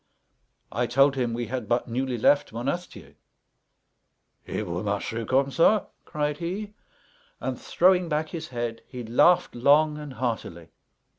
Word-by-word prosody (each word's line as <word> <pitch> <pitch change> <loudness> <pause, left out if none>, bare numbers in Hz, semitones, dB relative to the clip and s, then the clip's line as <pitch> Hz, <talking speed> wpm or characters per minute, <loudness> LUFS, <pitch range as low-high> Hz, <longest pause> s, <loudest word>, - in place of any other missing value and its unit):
I 120 +3 0
told 135 +3 +4
him, 125 -3 -1
we 120 +1 -3
had 120 -1 -5
but 120 +1 +1
newly 125 +1 -2
left 145 +6 +3
Monastier. 135 +10 -5 1.3
"Et - - -3
vous - - -4
marchez 115 0 -2
comme 135 +1 +2
ça!" 195 +7 +3 0.2
cried 150 -1 -2
he; 200 +5 -4 0.7
and, - - -4
throwing 180 -1 +3
back 155 0 -1
his 165 -2 -6
head, 120 -2 -4
he 125 -2 -7
laughed 170 +10 +3
long 150 +5 +3
and 150 -3 -8
heartily. 110 -9 -4
135 Hz, 140 wpm, -26 LUFS, 120-155 Hz, 1.3 s, told